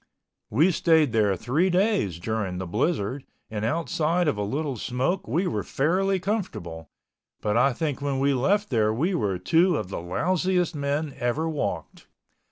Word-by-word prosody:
We 155 - +4
stayed 160 -5 +3
there 105 -3 +2
three 140 - +1
days 180 - +1
during 105 -2 -2
the 95 - -4
blizzard 125 - -1 0.3
and 105 -1 -3
outside 165 +5 0
of 150 - +2
a 105 - -3
little 135 +7 -2
smoke 135 - -2
we 180 +4 0
were 105 - -1
fairly 185 +7 +1
comfortable, 90 - -4 0.5
but 105 0 -1
I 130 +4 +4
think 145 +2 -3
when 140 -1 -1
we 140 +1 +2
left 200 +11 +1
there 110 -3 +2
we 155 - 0
were 100 - 0
two 165 - +3
of 90 - -4
the 95 - -4
lousiest 180 - 0
men 145 0 -2
ever 125 +7 0
walked. 155 -3 -4
140 Hz, 165 wpm, -25 LUFS, 110-175 Hz, 0.5 s, We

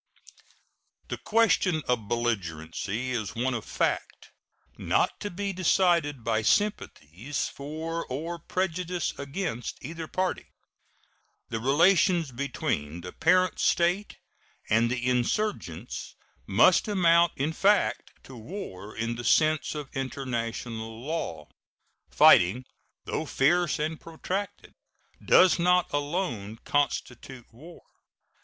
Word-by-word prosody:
The - - -4
question 195 -7 +2
of 120 -4 0
belligerency 105 0 -2
is 115 -2 -3
one 125 +2 0
of 115 -3 -3
fact, - - -2 0.4
not - - 0
to 205 - -4
be 200 +2 -3
decided 170 -7 +2
by 110 -1 +1
sympathies 120 - -1
for 160 +4 -5
or 165 +6 -4
prejudices 180 0 -2
against 140 -4 -4
either 165 +3 -6
party. 185 +2 -2 1.0
The 115 - -3
relations 165 - +3
between 90 - -3
the 90 +1 -8
parent 185 +2 +2
state 175 +4 +1 0.5
and 115 +2 +4
the 125 0 -2
insurgents 125 - -2 0.3
must - - +4
amount 170 -4 +4
in 150 +4 -1
fact 200 +4 +2
to 130 - -12
war 110 - -8
in 115 +1 -2
the 120 - -6
sense 155 +5 +2
of 150 -2 -5
international 115 -4 -4
law. 165 +2 -4 0.6
Fighting, 105 +9 +5 0.4
though - - -3
fierce 170 +4 +2
and 155 +1 -3
protracted, 185 +5 -5 0.5
does 185 -1 +5
not 180 +1 +2
alone 145 - -2
constitute 130 -3 -2
war. 160 +9 -14
145 Hz, 110 wpm, -27 LUFS, 120-175 Hz, 1.0 s, Fighting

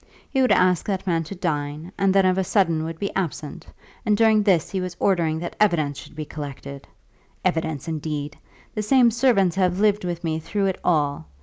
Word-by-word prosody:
He 265 - +2
would 255 - +3
ask 180 -1 +3
that 195 -2 -2
man 165 -3 +1
to 195 - -7
dine, 155 -1 -3
and 195 -1 +2
then 195 0 +4
of 185 0 +2
a - - +2
sudden 170 -5 +1
would 165 0 -5
be 200 +3 -3
absent; 160 -6 -4 0.4
and 210 -1 +2
during 220 -1 +4
this 190 -6 +2
he 190 -2 -2
was 180 -1 -5
ordering 170 -5 +1
that 170 +1 -5
evidence 155 -9 +2
should - - -13
be 155 0 -5
collected! 140 -2 -8 0.6
Evidence, 160 -5 -1
indeed! 150 -2 -4 0.4
The 215 - -2
same 240 +2 +4
servants 225 -7 +2
have 185 -1 +1
lived 210 -1 +2
with 175 -1 -4
me 160 -1 -1
through 200 +5 -2
it 190 -1 -1
all. 145 - 0
175 Hz, 200 wpm, -23 LUFS, 155-195 Hz, 0.6 s, then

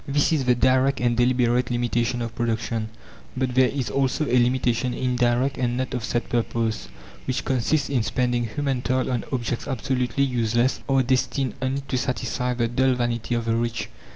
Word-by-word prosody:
This 145 +3 +2
is 140 -4 +1
the 125 -1 +4
direct 130 +3 +3
and 120 -1 +1
deliberate 125 0 +2
limitation 120 0 0
of 115 -1 -5
production; 115 -1 -2 0.5
but 130 -1 0
there 130 0 +4
is 135 -3 -3
also 135 +3 +1
a 125 - -2
limitation 125 0 +1
indirect 125 +1 +1
and 120 -1 0
not 130 0 -2
of 125 -3 -2
set 120 +1 -1
purpose, 115 - -1 0.4
which 130 - -2
consists 135 +3 +1
in 135 -4 +1
spending 120 +1 0
human 135 +2 -2
toil 130 +1 0
on 120 -2 -1
objects 120 -2 -2
absolutely 130 +1 -1
useless, 120 -1 +1
or 135 -1 +3
destined 130 0 0
only 135 +1 -1
to 130 - 0
satisfy 125 -1 -2
the 120 -1 +1
dull 130 +2 +2
vanity 120 -1 -1
of 115 -1 -2
the 115 0 +1
rich. 115 0 -2
125 Hz, 180 wpm, -24 LUFS, 120-130 Hz, 0.5 s, the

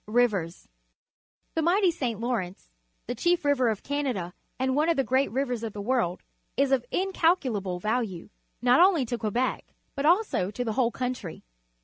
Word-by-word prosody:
Rivers. 210 -7 0 0.4
— - - -52
The 325 - 0
mighty 360 +3 +3
St. 240 -9 -3
Lawrence, 215 - -3 0.3
the 245 - -3
chief 345 +6 +1
river 265 -4 +3
of 215 -3 -3
Canada 255 -12 -2 0.2
and 260 0 0
one 305 +3 +2
of 335 - +2
the 270 - +3
great 260 +3 +1
rivers 250 -2 -2
of 225 -2 -5
the 210 - -7
world, 215 -6 0 0.3
is 275 0 +2
of 265 -3 +3
incalculable 300 - 0
value, 210 -2 -2 0.3
not 250 +1 +5
only 350 -6 +5
to 240 0 -3
Quebec 235 +4 -2 0.2
but 280 +1 0
also 345 - +2
to 245 +4 -4
the 220 - -1
whole 240 0 +2
country. 245 -9 -5
250 Hz, 170 wpm, -27 LUFS, 215-285 Hz, 0.4 s, not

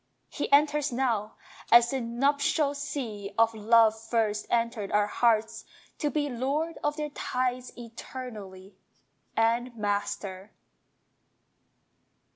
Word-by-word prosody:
He - - -4
enters 295 0 +4
now, 235 -4 -1 0.4
as 235 0 +7
the 265 -1 -1
nuptial 280 +5 +1
sea 255 -9 -5
Of 230 0 +4
love 220 +1 +5
first 225 -2 -1
entered 230 -3 -1
our 210 0 +3
hearts, 225 0 +1 0.4
to 295 - 0
be 290 0 -1
Lord 280 +6 -2
of 295 0 0
their 300 -1 -3
tides 255 -2 -2
eternally, 220 -5 -9 0.6
And 235 +2 +1
Master! 205 -1 -3
235 Hz, 105 wpm, -28 LUFS, 215-275 Hz, 0.6 s, as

